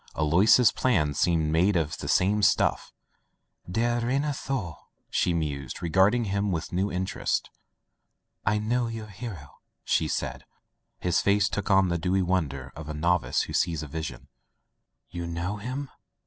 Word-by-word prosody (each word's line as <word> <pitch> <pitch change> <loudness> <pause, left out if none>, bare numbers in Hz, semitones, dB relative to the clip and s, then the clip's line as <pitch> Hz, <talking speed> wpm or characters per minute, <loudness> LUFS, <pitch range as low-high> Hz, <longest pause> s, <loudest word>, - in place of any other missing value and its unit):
Alois's 95 +10 +5
plan 85 - +1
seemed 80 0 +1
made 90 +5 +3
of 80 -2 0
the - - -5
same 100 +3 +2
stuff 105 +2 +2 0.8
"Der 120 +5 +1
reiner 140 +5 0
Thor," 120 - -4 0.3
she 90 - +2
mused, 75 -2 -3
regarding 95 +8 +3
him 100 0 -1
with 85 -1 -3
new 95 +3 0
interest, 90 +1 -2 0.9
"I 105 +1 +2
know 120 +3 0
your 115 -1 -5
hero/' 100 - -9 0.2
she - - +1
said. - - -3 0.6
His 90 +1 +2
face 100 0 +3
took 105 0 -3
on 95 -2 +4
the 85 0 0
dewy 95 +3 +1
wonder 75 -8 -2
of 80 0 -8
a 75 - -4
novice 85 +3 +1
who - - -7
sees 80 -3 0
a - - -6
vision. 80 +1 -6 0.8
"You 85 -1 -5
know— 85 +5 -3
him?" 130 +5 -5
95 Hz, 150 wpm, -27 LUFS, 80-105 Hz, 0.9 s, Alois's